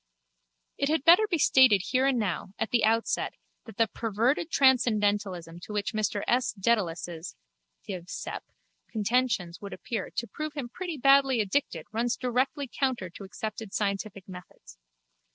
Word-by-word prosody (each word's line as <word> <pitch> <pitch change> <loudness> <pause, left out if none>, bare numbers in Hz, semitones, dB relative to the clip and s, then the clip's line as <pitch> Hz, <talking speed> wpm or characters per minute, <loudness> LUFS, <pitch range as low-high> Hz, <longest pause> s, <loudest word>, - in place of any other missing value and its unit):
It 280 - +1
had 315 -3 +1
better 355 +7 +7
be 345 - +1
stated 260 - +5
here 260 +1 +3
and 270 -2 +2
now 200 -2 -3
at 225 - -2
the 235 -3 +2
outset 225 +1 +1 0.3
that 225 -4 -12
the 230 - +4
perverted 230 - 0
transcendentalism 205 - +2
to 210 - -9
which 205 +1 -2
Mr 210 -1 -1
S. 245 +1 +2
Dedalus' 180 -5 -1 0.5
(Div. 185 -5 -6
Scep.) - - -5 0.5
contentions 215 -5 0
would 200 -1 -7
appear 220 -5 -4
to 235 - -3
prove 305 +5 -6
him 265 -5 -4
pretty 350 +3 -5
badly 275 -1 +5
addicted 200 - -1
runs 235 +2 0
directly 260 +3 -1
counter 245 -8 -2
to 195 - -10
accepted 215 +1 -6
scientific 200 -1 -2
methods. 180 - -12
225 Hz, 150 wpm, -28 LUFS, 200-260 Hz, 0.5 s, better